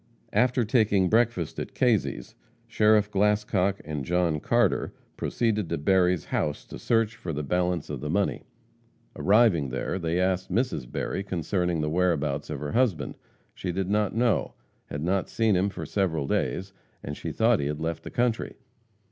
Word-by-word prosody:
After 125 +2 +3
taking 105 -5 +3
breakfast 110 -8 +1
at - - -6
Kazy's, 110 - 0 0.3
Sheriff 105 -1 +3
Glascock 100 -1 +1
and 75 -2 -4
John 85 0 +1
Carter - - +1 0.2
proceeded 110 -6 -1
to - - -1
Berry's 90 +2 +2
house 75 - -2
to - - -9
search 115 - +1
for 85 - -5
the 75 0 -3
balance 90 +2 0
of - - -5
the 75 - -4
money. 100 +5 0 0.7
Arriving 100 - +3
there, 65 +8 -3
they 85 0 -1
asked 95 0 0
Mrs. 110 - -1
Berry 95 - -2
concerning 90 -2 -1
the 75 - -1
whereabouts 80 -5 0
of 70 - -4
her 75 -1 -3
husband. 120 -9 +1 0.4
She 90 - -4
did 95 +2 -2
not 105 -1 +1
know; 120 -2 +1 0.3
had 70 +1 -5
not 95 +2 0
seen 110 -3 +2
him 95 +3 +2
for - - -6
several 85 -8 0
days, 95 +7 -1 0.3
and 75 - -5
she - - -5
thought - - +3
he 70 - -1
had 75 0 -3
left 80 0 -3
the - - -8
country. 120 -2 -1
95 Hz, 165 wpm, -26 LUFS, 80-105 Hz, 0.7 s, After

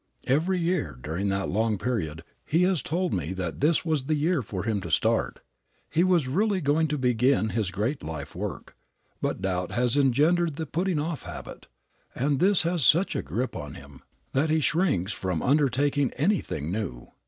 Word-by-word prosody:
Every 165 +8 +1
year 170 - -1
during 80 +9 -2
that 95 0 -1
long 110 +2 +1
period 95 -9 -3 0.2
he 165 +4 +2
has 185 -3 +2
told 180 +3 -1
me 80 +6 -2
that 90 0 -4
this 160 +4 +3
was 155 -5 0
the 155 - +1
year 155 +1 +1
for 95 -5 -5
him 105 -3 -1
to 85 - -6
start. 75 - +1 0.5
He 170 - +3
was 180 -7 +3
really 200 +8 +1
going 155 +1 +2
to 150 0 -2
begin 125 -2 +2
his 110 -3 -1
great 110 +10 -2
life 75 -3 -6
work, - - -6 0.5
but 95 - -2
doubt 90 -1 -1
has 120 +2 +1
engendered 150 +5 +3
the 160 - -3
putting 180 +2 -1
off 155 +1 -2
habit, - - -9 0.5
and 140 +1 0
this 195 -1 +5
has 170 -2 0
such 170 +9 +4
a - - 0
grip 110 - -3
upon 75 -1 -7
him 70 0 -13 0.3
that 145 +4 +1
he 160 +1 +3
shrinks 155 - +1
from 90 -4 -2
undertaking 140 0 +2
anything 135 - -1
new. 95 - -4
135 Hz, 180 wpm, -26 LUFS, 95-160 Hz, 0.5 s, this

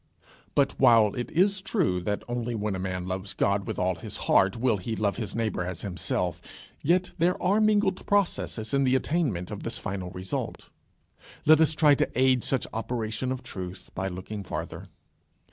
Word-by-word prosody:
But 140 -1 +3
while 110 -3 +6
it 120 - -4
is 190 +3 +2
true 180 - 0
that 105 +3 -2
only 120 -1 -2
when 105 -2 -2
a - - -4
man 90 -1 -3
loves 95 +1 -4
God 100 0 +1
with - - -3
all 90 0 +1
his - - -6
heart, 95 +3 +4
will 115 -2 +2
he 110 +4 -4
love 105 -2 0
his 110 -4 -4
neighbour 110 -5 -1
as 90 -1 -5
himself, 90 -2 -1 0.4
yet 180 +4 +2
there 175 +2 +2
are 200 +4 +2
mingled 210 -3 +2
processes 175 - 0
in 140 0 +3
the 130 0 +3
attainment 130 - 0
of - - -5
this - - -3
final 100 -3 -4
result. 90 +1 -5 0.7
Let 155 +1 +7
us 160 0 +4
try 150 -2 +6
to - - +1
aid 130 -2 +4
such 135 -4 0
operation 115 +1 -2
of 130 -1 -4
truth 95 -5 -8
by 95 +1 -2
looking 95 +3 -6
farther. 85 +1 -6
110 Hz, 180 wpm, -27 LUFS, 95-140 Hz, 0.7 s, Let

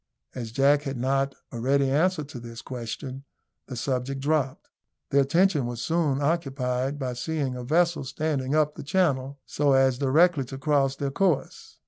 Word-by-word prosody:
As 120 -3 -6
Jack 140 +4 +4
had 135 -3 -4
not 135 +2 0 0.2
a 120 - -6
ready 135 +3 +2
answer 160 +3 +2
to 140 -3 -9
this 115 0 -9
question, 130 +2 -6 0.4
the 130 - -6
subject 130 +2 -2
dropped. 140 -2 -1 0.4
Their 140 - +5
attention 155 -1 +2
was 120 -1 -5
soon 145 0 0
occupied 135 -4 -1
by 130 -3 -3
seeing 135 0 -2
a 125 - -6
vessel 170 +4 +2
standing 140 0 -2
up 150 -1 +2
the - - -8
channel, 140 -5 0
so 145 -1 +1
as 135 -1 +3
directly 150 +2 +4
to 135 +2 -8
cross 140 -1 +1
their 140 0 -3
course. 170 0 -1
135 Hz, 165 wpm, -26 LUFS, 130-150 Hz, 0.4 s, Their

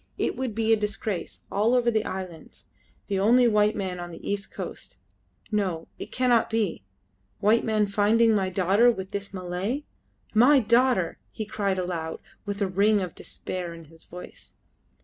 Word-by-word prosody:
"It - - 0
would 255 -5 -3
be 225 0 +3
a - - +7
disgrace... 210 -2 -4
all 220 +5 +2
over 240 -1 +3
the 220 -1 +1
islands,... 185 -4 -7 0.4
the 195 -2 -1
only 240 +5 +5
white 210 -1 +3
man 185 -3 -3
on 175 0 -6
the 165 - -9
east 200 -1 -3
coast. - - -7 0.5
No, 185 -6 -1
it - - -7
cannot 250 -2 +2
be... 215 - -1 0.6
white 215 +3 +3
men 215 -1 +2
finding 215 +3 +3
my 195 -3 +1
daughter 195 +6 +4
with 190 -5 -3
this 200 0 -5
Malay. 185 +9 -3 0.5
My 250 +7 +6
daughter!" 235 -6 +2
he 215 - -5
cried 200 -2 -1
aloud, 175 -3 -3 0.3
with 205 0 -1
a - - +1
ring 205 +3 +3
of 180 -3 -4
despair 175 -2 -6
in 165 - -11
his 160 +1 -17
voice. 180 +1 -11
205 Hz, 170 wpm, -26 LUFS, 185-225 Hz, 0.6 s, a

